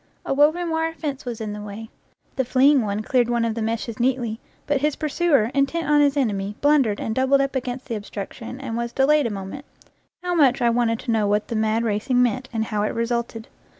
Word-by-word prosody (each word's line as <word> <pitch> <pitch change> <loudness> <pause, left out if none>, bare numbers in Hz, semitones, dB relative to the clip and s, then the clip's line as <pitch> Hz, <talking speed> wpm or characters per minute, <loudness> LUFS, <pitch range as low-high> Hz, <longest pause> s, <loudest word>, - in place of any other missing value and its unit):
A - - 0
woven 315 +5 +3
wire 325 0 0
fence 285 -5 -5
was 240 -2 -5
in 215 -2 -4
the 210 - -7
way; 210 +2 -8 0.4
the 265 - +1
fleeing 265 +2 +4
one 210 0 -2
cleared 245 0 +2
one 235 -1 +1
of 230 - -1
the 230 - -4
meshes 225 +1 -3
neatly, 240 -3 0 0.3
but 285 -2 0
his 300 0 +1
pursuer, 300 -6 +1
intent 280 +4 0
on 295 0 +4
his 285 0 +2
enemy, 205 -6 -1
blundered 280 -8 +3
and 220 - -2
doubled 265 +3 +3
up 275 0 -1
against 250 0 -3
the 240 - -5
obstruction 215 +4 -7
and 255 -4 -5
was 235 0 -3
delayed 285 0 +3
a - - -3
moment 200 +6 -6 0.6
how 360 0 -1
much 275 -6 +4
I 240 -2 +3
wanted 230 -1 +1
to 245 - -2
know 215 -2 +2
what 205 +1 0
the 230 - -2
mad 220 +1 +1
racing 230 +4 0
meant, 255 +2 -1
and 220 -2 -1
how 210 -1 -2
it 210 - -1
resulted! 230 -1 -2
240 Hz, 220 wpm, -23 LUFS, 220-275 Hz, 0.6 s, fleeing